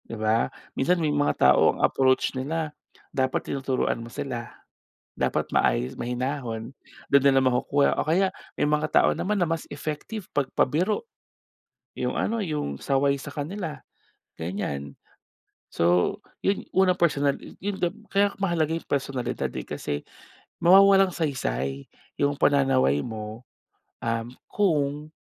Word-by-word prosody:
Di 115 - -5
ba? 110 +1 +1 0.2
Minsan 180 +7 +2
may 155 -3 0
mga 145 0 +4
tao - - +4
ang - - -12
approach 130 -1 +2
nila 150 +4 -3 0.4
dapat 130 -1 0
tinuturuan 130 -3 -1
mo 115 - -8
sila, - - -5 0.7
dapat - - -1
maayos, - - +1
mahinahon. 125 -2 -3 0.4
Dun 140 - +6
nila 135 -1 +5
makukuha 130 +2 +2
o - - 0
kaya 185 +4 +3 0.2
may - - 0
mga 150 +1 +1
tao - - +5
naman 210 +3 -1
na 175 - +3
mas 165 -1 -2
effective 155 +8 -5
pag 140 -2 0
pabiro 175 +10 +1 0.9
yung - - -2
ano, 225 -1 0
yung 150 - -3
saway 140 +1 +2
sa 140 +1 -8
kanila 155 +3 -4 0.6
ganyan. 70 -6 -4 0.8
So 90 +1 +2 0.3
yun 195 - +1
unang 185 -1 +4
personal 145 -4 +3 0.2
yun 200 +1 -4
gab 175 0 +1 0.2
kaya 200 +1 +4
mahalaga 165 -5 +1
yung - - -10
personalidad, 135 -3 -2
eh, - - -4
kasi 75 -1 -4 0.6
mawawalang 195 +2 +7
saysay 70 - -2 0.3
yung 145 0 0
pananaway 130 - +3
mo, 110 0 -6 0.6
um, 115 0 -1 0.2
kung 150 -6 0
140 Hz, 135 wpm, -26 LUFS, 120-165 Hz, 0.9 s, mawawalang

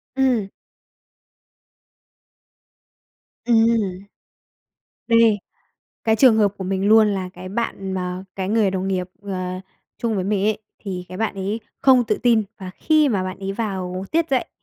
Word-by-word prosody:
Ừm. 255 -7 +2 3.0
Ừm. 230 -1 +4 1.3
Đây, 230 -2 +4 0.7
cái 220 -1 +3
trường 235 -1 +6
hợp 210 -2 +4
của 190 - -4
mình 190 +1 0
luôn 220 0 +6
là 190 -3 -2
cái 185 +1 -9
bạn 195 -2 -3
mà 185 0 -3
cái 190 0 -2
người 215 -2 +2
đồng 190 0 -2
nghiệp, 185 -1 -1
ờ, 185 -2 -4 0.4
chung 230 -2 -1
với 185 -2 -1
mình 200 -1 0
ấy, 215 -1 +1 0.2
thì 185 -3 -5
cái 185 - -8
bạn 220 -2 -1
ấy 200 +4 -3 0.2
không 255 -2 +5
tự - - 0
tin 235 -3 +4 0.2
và 190 -2 -7
khi 310 -2 +3
mà 200 -7 0
bạn 185 0 -5
ấy 195 0 -4
vào 190 -4 -3
tiết 330 +1 +1
dạy, 260 -2 +1
200 Hz, 150 wpm, -22 LUFS, 190-230 Hz, 3.0 s, trường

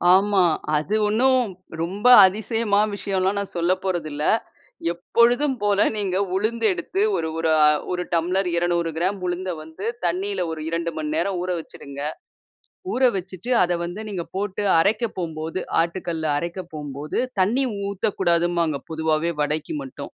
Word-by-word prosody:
ஆமா. 195 -1 +3 0.3
அது 195 +8 -1
ஒன்னும் 255 +4 +3 0.4
ரொம்ப 200 +7 -1 0.2
அதிசயமா 210 +1 +1
விஷயம்லாம் 195 0 0
நான் 200 -2 -6
சொல்ல 170 +2 +2
போறதில்ல. 155 -5 -2 0.7
எப்பொழுதும் 245 +9 +2
போல 205 -1 +3
நீங்க 190 -3 0 0.2
உளுந்து 225 +3 0
எடுத்து 270 - -3
ஒரு 160 - -1
ஒரு 165 0 0
அ - - +8 0.3
ஒரு 180 0 -1
டம்ளர் 180 +3 +1
200 170 -1 +1
கிராம் 190 +4 0
உளுந்த 180 +1 -3
வந்து 160 +6 -9 0.2
தண்ணீல 185 +2 -1
ஒரு 155 -1 -5
2 170 0 -2
மணி 305 0 -3
நேரம் 195 - 0
ஊற 185 - -3
வச்சுருங்க. 140 -3 -10 1.0
ஊற 265 - -1
வச்சுட்டு 185 +6 -4
அத 175 -1 +1
வந்து 180 +5 -5
நீங்க 175 -4 -3
போட்டு 205 +1 -2 0.2
அரைக்க 215 +5 +2
போம்போது 160 +1 -3 0.2
ஆட்டுக்கல்ல 170 -2 -3
அரைக்க 175 +3 -4
போம்போது 145 - -4 0.2
தண்ணீ 240 +9 +2 0.3
ஊத்தக்கூடாதும்பாங்க. 175 -5 +1
பொதுவாவே 160 +1 0
வடைக்கு 155 - -2
மட்டும். 270 - -8
185 Hz, 135 wpm, -23 LUFS, 170-205 Hz, 1.0 s, அ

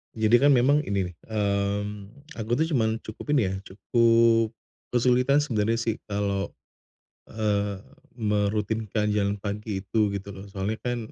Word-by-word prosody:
Jadi 110 +1 +4
kan 140 - +4
memang 135 +4 +4
ini 95 -3 -1
nih, - - -21
mmm, 100 -1 -1 0.3
aku 110 +2 0
tuh 160 - +2
cuman 110 -6 +2
cukup 130 +7 -3
ini 105 -9 +2
ya, - - -3
cukup 115 +2 +3 0.4
kesulitan 125 +4 +3
sebenarnya 115 -5 0
sih 115 -1 -1
kalau, 100 -1 -2 0.8
eee, 105 -2 -1 0.4
merutinkan 105 0 0
jalan 100 0 0
pagi 105 0 -4
itu 105 +2 +1
gitu 100 0 -5
loh 95 +1 -9
soalnya 100 +3 -2
kan 120 -1 -1
105 Hz, 140 wpm, -26 LUFS, 100-115 Hz, 0.8 s, Jadi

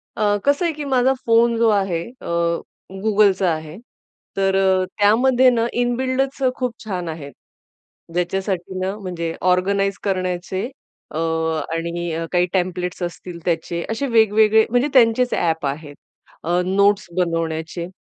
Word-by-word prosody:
अ, 205 -1 +2
कसं 285 +5 +2
आहे, 335 - 0
की 295 -1 -6
माझा 260 -1 +3
फोन 230 0 +4
जो 230 0 +4
आहे, 195 -5 +1 0.2
अ, 170 0 -1 0.4
Googleचा 200 -4 +3
आहे. 155 +1 -7 0.6
तर 195 0 +2
अ, 190 -1 +3 0.2
त्यामध्ये 250 +5 +5
न 230 -1 +1
इनबिल्डच 260 +3 -1
खूप 250 -2 -2
छान 180 -5 -3
आहेत, 145 -4 -7 0.8
ज्याच्यासाठी 185 +1 -2
न 185 +1 -1
म्हणजे 170 -3 -4 0.2
ऑर्गनाइज 195 +1 +1
करण्याचे 185 0 -2 0.5
अ, - - -5 0.6
आणि 170 0 -3
काही 180 0 +3
टेम्प्लेट्स 180 -1 -2
असतील 175 0 -6
त्याचे, 170 0 -1
असे 250 +5 -2
वेगवेगळे 220 -1 +4
म्हणजे 245 +4 +2
त्यांचेच 245 -1 +4
ॲप 160 -3 0
आहेत 145 +1 -4 0.5
अ, 175 +2 +1
नोट्स 200 +2 +2
बनवण्याचे. 165 -1 -2
190 Hz, 130 wpm, -21 LUFS, 170-230 Hz, 0.8 s, त्यामध्ये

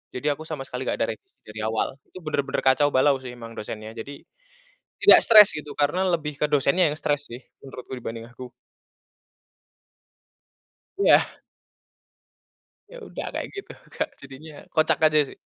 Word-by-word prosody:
Jadi 125 +4 -3
aku 155 - -10
sama 155 -4 -6
sekali 125 +1 -5
gak - - -2
ada - - +1
revisi 385 -2 -36
dari 110 0 -9
awal. 110 +3 -2
Itu 185 - -12
bener-bener 145 -2 -1
kacau 145 +2 +3
balau 140 +2 +3
sih 125 - -7
emang 115 -1 -11
dosennya. 110 +1 -7
Jadi 140 +5 -8 0.8
tidak - - +8
stres 215 -2 +9
gitu 150 -1 -8
karena 150 +6 +1
lebih 150 -3 -2
ke - - +4
dosennya 145 +3 +3
yang 150 - -5
stres 145 -1 -1
sih 120 +2 -8 0.2
menurutku 130 -1 -10
dibanding 115 -1 -7
aku. 125 0 -11 2.5
Iya. 400 - +5 1.7
Ya - - -11
udah - - -7
kayak - - -4
gitu, 400 - -8 0.2
Kak, - - -2
jadinya 145 +2 -12
kocak 160 -1 +3
aja 155 -1 +4
sih. - - -14
145 Hz, 155 wpm, -24 LUFS, 125-155 Hz, 2.5 s, stres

